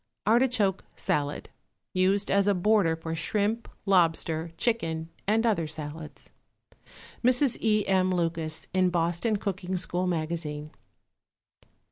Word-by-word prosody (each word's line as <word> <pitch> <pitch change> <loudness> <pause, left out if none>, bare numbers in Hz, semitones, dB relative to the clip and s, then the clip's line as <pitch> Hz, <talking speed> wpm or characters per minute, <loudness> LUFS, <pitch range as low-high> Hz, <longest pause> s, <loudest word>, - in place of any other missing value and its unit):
=Artichoke 225 -4 +2
Salad.= 145 0 -2 0.4
(Used 190 +2 +2
as 200 0 +3
a 205 - +3
border 185 -3 +3
for 160 0 -5
shrimp, 210 +7 -1 0.2
lobster, 165 -3 +2
chicken 165 -9 -1 0.2
and 220 +3 +2
other 195 -9 +1
salads.) 155 0 -8 0.9
(MRS. 250 +1 +3
E. 215 -2 +2
M. 185 -1 +3
LUCAS, 165 -3 -1
IN 185 -1 +3
BOSTON 175 +5 0
COOKING 190 -2 -3
SCHOOL 180 0 -1
MAGAZINE.) 155 -3 -3
185 Hz, 110 wpm, -27 LUFS, 165-210 Hz, 0.9 s, as